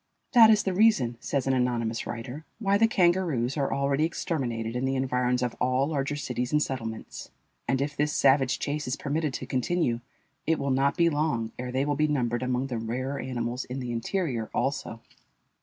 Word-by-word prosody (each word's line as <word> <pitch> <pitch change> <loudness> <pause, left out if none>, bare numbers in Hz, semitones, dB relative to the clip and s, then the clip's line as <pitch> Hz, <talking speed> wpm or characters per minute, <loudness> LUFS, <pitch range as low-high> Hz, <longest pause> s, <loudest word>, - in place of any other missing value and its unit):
"That 230 -4 +8
is 215 -1 +5
the 190 - -1
reason," 180 - +3
says 135 +1 -1
an 135 - +2
anonymous 120 -3 0
writer, 120 +6 -6
"why 200 -3 +1
the 225 - +6
kangaroos 175 - +2
are 140 -3 0
already 140 +2 +1
exterminated 120 -9 -2
in 125 - -1
the 135 0 0
environs 125 -1 0
of 120 -2 -1
all 130 +2 +2
larger 145 -1 -1
cities 125 -3 -3
and 150 - +3
settlements; 115 -6 -5 0.4
and 130 - +1
if 145 +1 -2
this 150 +1 +1
savage 135 -2 +3
chase 150 0 -3
is 125 - -1
permitted 150 +1 -1
to - - -5
continue, 130 -1 0 0.5
it 160 0 +3
will 140 0 -1
not 140 +3 +2
be 170 -1 +4
long 145 -7 0
ere 125 0 -4
they 130 +2 0
will 145 0 0
be 155 +2 +2
numbered 120 -5 0
among 125 +1 0
the 125 -4 -3
rarer 130 +5 -3
animals 125 0 -3
in 125 +2 -5
the 125 -2 -4
interior 120 - -2
also." 135 -4 -2
135 Hz, 190 wpm, -27 LUFS, 125-150 Hz, 0.5 s, That